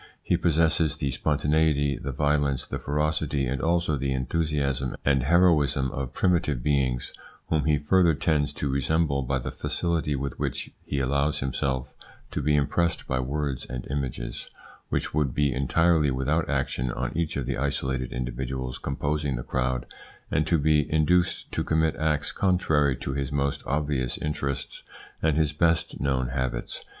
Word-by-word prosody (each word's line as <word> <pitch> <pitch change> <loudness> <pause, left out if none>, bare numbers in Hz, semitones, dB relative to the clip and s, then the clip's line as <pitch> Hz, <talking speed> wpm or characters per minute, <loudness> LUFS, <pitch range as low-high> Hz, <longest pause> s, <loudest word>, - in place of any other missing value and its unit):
He - - +2
possesses 80 -2 +2
the 70 - -1
spontaneity, 75 0 +2
the 70 - -5
violence, 70 -1 +1
the - - -4
ferocity, 75 -1 0
and 65 +1 -2
also 85 -2 +1
the 70 0 -1
enthusiasm 70 -1 -1
and 70 -1 +3
heroism 75 -4 +3
of 65 -2 -4
primitive 75 -7 +1
beings, 65 -4 0 0.4
whom 75 -3 +1
he 75 -1 +3
further 85 +3 +3
tends 75 -2 +1
to 70 - -3
resemble 70 +1 +1
by 65 +1 0
the 65 - -4
facility 75 0 -1
with 70 -1 -4
which - - -3
he 70 - -2
allows 70 +2 +1
himself 65 -1 -2 0.4
to - - -2
be 75 +1 +2
impressed 75 +4 +1
by 65 - -1
words 70 0 -2
and 60 0 -6
images 70 -3 -4 0.4
which - - -1
would 70 -4 0
be 70 -3 +2
entirely 75 +4 +3
without 65 0 0
action - - -1
on - - -3
each 85 -3 -1
of 70 - -2
the - - -2
isolated 65 -2 -1
individuals 65 0 -4
composing 70 0 -1
the - - -4
crowd 65 -1 -1 0.5
and 80 +1 +1
to 85 - +3
be 75 -1 +2
induced 85 +3 +2
to - - -1
commit 80 0 +1
acts 75 -1 +1
contrary 80 -7 +2
to 65 - -4
his 70 0 -2
most 70 -1 0
obvious 70 -3 0
interests 70 -3 -3 0.4
and 80 -2 +2
his 75 -2 +2
best 80 +2 +1
known 65 -3 0
habits. 65 -2 -3
70 Hz, 160 wpm, -26 LUFS, 65-75 Hz, 0.5 s, and